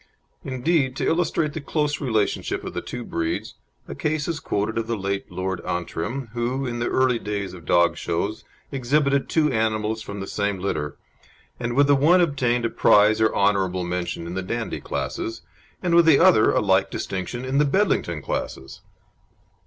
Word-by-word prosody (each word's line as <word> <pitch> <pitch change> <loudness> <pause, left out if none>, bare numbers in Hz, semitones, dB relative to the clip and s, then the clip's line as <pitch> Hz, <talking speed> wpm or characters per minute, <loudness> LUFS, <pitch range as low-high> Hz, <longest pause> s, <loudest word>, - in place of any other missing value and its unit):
Indeed 130 +1 0
to - - -2
illustrate 165 -2 +1
the 160 - -5
close 150 0 -1
relationship 110 -7 -1
of - - -6
the - - -3
two 125 -1 -6
breeds 85 -6 -3 0.3
a - - -6
case 150 0 -1
is 165 -2 -2
quoted 110 +2 -1
of 115 - -3
the 115 -1 -1
late 100 0 -3
Lord 95 0 -3
Antrim, 100 +9 -3
who, 125 +3 -1
in 120 -1 -3
the 120 - 0
early 130 -2 +2
days 100 -3 -4
of 85 -3 -11
dog 85 -1 +3
shows, 100 +6 -2 0.3
exhibited 140 +1 +1
two 155 -3 +2
animals 110 0 0
from 100 -1 -7
the 95 - -4
same 100 0 -1
litter, 75 -6 -3 0.6
and 120 0 -2
with 145 +1 +5
the 145 - +4
one 155 +7 +5
obtained 125 -8 +1
a - - +1
prize 105 +1 +4
or 110 - +4
honourable 95 -2 +1
mention 90 -1 -3
in 85 - -6
the 95 - -2
Dandie 115 +5 -4
classes, 115 - -4 0.4
and 175 -2 +1
with 170 -1 +6
the 155 -4 +7
other - - +6
a - - +2
like - - +2
distinction 95 +7 -4
in 135 +2 +1
the - - +5
Bedlington 140 - +1
classes. 65 0 -5
115 Hz, 180 wpm, -23 LUFS, 95-140 Hz, 0.6 s, the